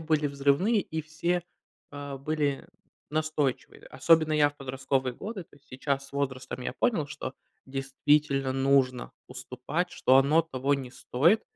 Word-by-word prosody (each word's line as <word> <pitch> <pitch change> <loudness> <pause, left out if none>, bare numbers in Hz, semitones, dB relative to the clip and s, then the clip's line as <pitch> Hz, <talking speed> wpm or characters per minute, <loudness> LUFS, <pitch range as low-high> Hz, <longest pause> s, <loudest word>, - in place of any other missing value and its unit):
были 155 -2 +1
взрывные 140 +10 +2
и 160 -3 -4
все, 165 +3 -1 0.5
а, 145 -1 -6
были 145 -1 -1 0.4
настойчивые. 155 -3 -2
Особенно 155 +3 +3
я 150 -1 +4
в 145 - -25
подростковые 135 -1 -2
годы, 200 - -6
то 145 - -22
есть 140 - -26
сейчас 140 +1 -2
с - - -22
возрастом 130 -2 -3
я - - -3
понял, 210 -12 0
что 145 -3 -6 0.3
действительно 135 0 +1
нужно 135 -2 +2 0.2
уступать, 130 +7 -4
что 130 - +4
оно 150 +5 +5
того 140 -2 0
не 130 -3 -5
стоит. 165 - +2
140 Hz, 145 wpm, -28 LUFS, 135-155 Hz, 0.5 s, оно